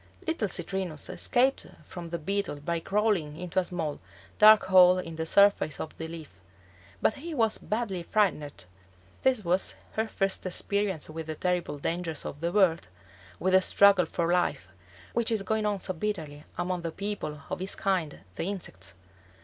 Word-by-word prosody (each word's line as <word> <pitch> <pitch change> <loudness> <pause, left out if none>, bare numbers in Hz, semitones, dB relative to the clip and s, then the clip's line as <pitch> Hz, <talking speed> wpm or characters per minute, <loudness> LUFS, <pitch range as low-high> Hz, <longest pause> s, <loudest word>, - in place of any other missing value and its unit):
Little 320 - -1
Citrinus 185 -5 -3
escaped 260 +2 +1 0.2
from 175 -2 -8
the 170 - -2
Beetle 195 -2 -2
by 170 +3 -1
crawling 195 -5 0
into 180 +1 -1
a - - +1
small, 165 -5 -3 0.4
dark 215 0 +8
hole 185 -1 +7
in 165 -3 -5
the 160 0 -3
surface 200 -6 +4
of 155 - -6
the 160 - -4
leaf; 160 - -9 0.7
but - - +4
he 315 +3 -7
was 225 -4 +1
badly 210 -5 -2
frightened. 170 - 0 0.6
This 255 -7 +2
was 180 +3 +1 0.2
his 220 0 0
first 195 -2 -1
experience 195 -2 -1
with 160 0 -7
the 155 - -4
terrible 180 -4 -1
dangers 165 +1 -3
of 145 - -6
the 170 +1 0
world, 180 - +3 0.5
with 185 +1 +1
the 190 - +7
struggle 195 -2 +5
for 170 +1 0
life, 135 - 0 0.4
which 235 -1 +1
is 215 -3 +1
going 215 +2 0
on 205 -1 -1
so 185 - -3
bitterly 160 -6 -4
among 180 0 -2
the 165 -1 -3
people 195 -5 -4
of - - -2
his 190 +2 -3
kind, 185 -7 -1 0.2
the - - -2
insects. 100 - -7
180 Hz, 170 wpm, -28 LUFS, 160-205 Hz, 0.7 s, dark